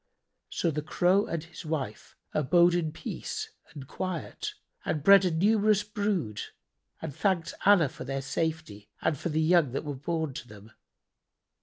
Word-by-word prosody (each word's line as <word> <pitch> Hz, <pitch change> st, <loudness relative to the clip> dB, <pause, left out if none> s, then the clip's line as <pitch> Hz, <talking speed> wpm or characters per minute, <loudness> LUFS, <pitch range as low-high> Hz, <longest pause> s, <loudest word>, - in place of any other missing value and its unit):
[FN#78] -, -, -21 dB
So 170 Hz, -, +2 dB
the 150 Hz, 0 st, -2 dB
Crow 180 Hz, +6 st, +2 dB
and 165 Hz, -2 st, -3 dB
his 165 Hz, 0 st, -11 dB
wife 145 Hz, -9 st, -4 dB, 0.2 s
abode 175 Hz, +4 st, +4 dB
in 170 Hz, -3 st, 0 dB
peace 435 Hz, -, -5 dB, 0.2 s
and 140 Hz, -4 st, -10 dB
quiet 185 Hz, -2 st, -4 dB, 0.3 s
and 150 Hz, -3 st, -2 dB
bred 195 Hz, +2 st, +8 dB
a -, -, +3 dB
numerous 210 Hz, +4 st, +3 dB
brood 200 Hz, -, -2 dB, 0.6 s
and 150 Hz, -4 st, -5 dB
thanked 185 Hz, -5 st, 0 dB
Allah 195 Hz, -7 st, +7 dB
for 130 Hz, -, -9 dB
their 135 Hz, +1 st, -3 dB
safety 155 Hz, -9 st, -3 dB
and 160 Hz, -1 st, +2 dB
for 160 Hz, -, -4 dB
the 155 Hz, 0 st, 0 dB
young 160 Hz, -5 st, +4 dB
that 140 Hz, -, -3 dB
were 145 Hz, -, -3 dB
born 155 Hz, +2 st, -2 dB
to 120 Hz, -, -7 dB
them. 105 Hz, +1 st, -14 dB
160 Hz, 165 wpm, -29 LUFS, 140-185 Hz, 0.6 s, bred